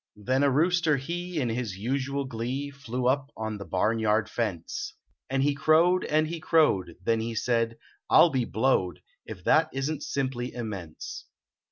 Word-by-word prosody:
Then 130 +6 0
a 140 - +4
rooster 165 +1 +3
he, 175 +5 -4
in 125 -4 0
his 115 -4 -3
usual 135 +5 -2
glee, 130 +3 -3
Flew 130 -3 -4
up 135 +2 +1
on 110 -1 -4
the 100 - -7
barnyard 110 +4 +1
ience, 100 -8 -3 0.4
And 135 +1 +1
lie 145 - +3
crowed 165 +5 +4
and 155 +1 +2
he 165 +1 -4
crowed; 125 - +2
then 115 +3 +2
he 115 +1 -3
said 115 0 0 0.2
" - - -39
I - - +6
ll 170 - +7
be 130 -3 0
blowed 110 - 0 0.2
It 90 - -8
that 160 0 +4
isn 135 +3 -1
t - - -18
simply 130 -4 -3
immense." 100 -9 -6
130 Hz, 175 wpm, -27 LUFS, 110-145 Hz, 0.4 s, ll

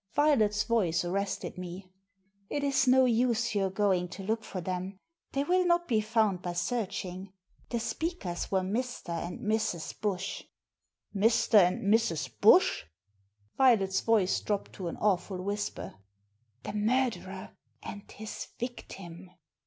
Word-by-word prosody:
Violet's 220 -9 +3
voice 180 -8 +1
arrested 195 +1 -3
me. 180 +1 -8 0.6
It 290 - -2
is 275 -1 +2
no 260 +1 +6
use 230 -1 +2
your 195 -2 +1
going 190 -2 +1
to 195 +2 -8
look 220 +3 -1
for 190 - -6
them. 185 +2 -4 0.4
They 275 - +1
will 365 +4 +3
not 345 -1 +2
be 220 -4 +2
found 215 -4 +1
by 175 -1 -3
searching. 185 -2 -3 0.4
The 235 - -1
speakers 230 - -3
were 190 -1 +2
Mr. 230 +3 -3
and 170 +1 -4
Mrs. 215 -6 -2
Bush." 195 -2 -2 0.7
"Mr. 220 +1 +5
and 180 -1 +2
Mrs. 200 -6 +1
Bush?" - - +6 0.4
" 100 +1 -41
Violet's 215 -8 +4
voice 215 -5 +2
dropped 205 -2 -2
to 185 - -5
an - - -5
awful 190 -2 0
whisper. 205 +2 -4 0.4
" 110 +3 -43
The - - -5
murderer 210 -4 -1 0.3
and 205 -1 -8
his 215 +1 -7
victim." 190 -7 -7
200 Hz, 140 wpm, -30 LUFS, 180-230 Hz, 0.7 s, no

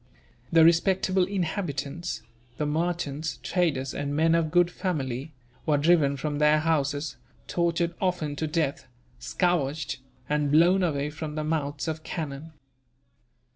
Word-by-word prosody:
The 165 -1 +6
respectable 185 +2 +3
inhabitants 175 -4 -3 0.3
the 150 - -1
merchants, 160 -1 -2
traders, 145 -8 0
and 145 0 -3
men 160 +2 +3
of 165 -2 +2
good 175 +1 +3
family 145 - -3 0.4
were 150 -2 +4
driven 145 -2 +3
from 145 +1 -2
their 150 0 +5
houses, 145 -2 0 0.3
tortured 170 0 0
often 180 -6 0
to 160 - -1
death, 150 -3 -1 0.3
scourged, 150 -3 0 0.3
and 150 -1 +1
blown 175 +5 +5
away 150 -4 0
from 155 0 -6
the 155 - -2
mouths 145 -2 -2
of 160 0 -3
cannon. 155 -1 -5
155 Hz, 130 wpm, -27 LUFS, 145-170 Hz, 0.4 s, The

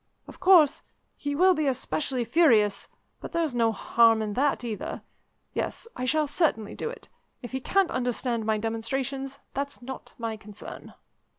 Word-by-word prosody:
Of - - -12
course, 360 -6 +6 0.3
he 285 0 -3
will 370 +4 +5
be 310 -4 0
especially 260 -1 -1
furious, 220 -11 +3 0.3
but - - -8
there's 330 -5 0
no 230 -2 +3
harm 225 +1 +4
in 210 -1 -3
that 275 +2 +1
either. 220 -4 -5 0.5
Yes, - - -3
I 250 - -3
shall 305 +4 +2
certainly 285 - 0
do - - -4
it. - - -10 0.4
If 245 - -7
he 265 - -2
can't 390 +6 +2
understand 245 -2 -1
my 215 0 +1
demonstrations, 265 +5 -3 0.2
that's 280 +1 -3
not 265 +1 -8
my 225 -2 -3
concern." 210 0 -10
255 Hz, 160 wpm, -27 LUFS, 225-295 Hz, 0.5 s, course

